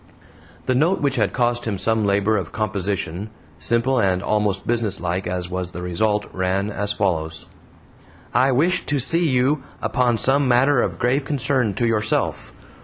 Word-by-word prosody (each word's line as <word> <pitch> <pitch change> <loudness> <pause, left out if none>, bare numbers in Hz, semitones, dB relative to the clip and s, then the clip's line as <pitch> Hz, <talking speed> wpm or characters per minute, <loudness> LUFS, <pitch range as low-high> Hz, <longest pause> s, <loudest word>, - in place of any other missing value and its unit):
The 130 - +1
note, 160 +9 +2
which 140 -2 0
had - - +1
cost 120 -1 0
him 105 -4 -2
some 110 +2 +1
labor 100 +2 +2
of 95 -5 -3
composition, 100 -2 -3 0.3
simple 120 +9 +2
and 95 -2 +1
almost 105 -2 0
businesslike 95 -6 -1
as 90 0 -3
was 90 0 -5
the 90 - -6
result, 105 +4 0
ran 95 +2 -1
as 105 0 -2
follows: 80 -6 -2 0.9
"I 135 +1 +3
wish 170 +8 +2
to 145 - +1
see 165 +5 +3
you 135 +3 +1 0.2
upon 125 -3 +1
some 135 +5 +2
matter 125 +2 +3
of - - -2
grave 130 +4 +1
concern 130 -6 0
to 120 - 0
yourself. 110 -2 -1
110 Hz, 160 wpm, -21 LUFS, 95-130 Hz, 0.9 s, I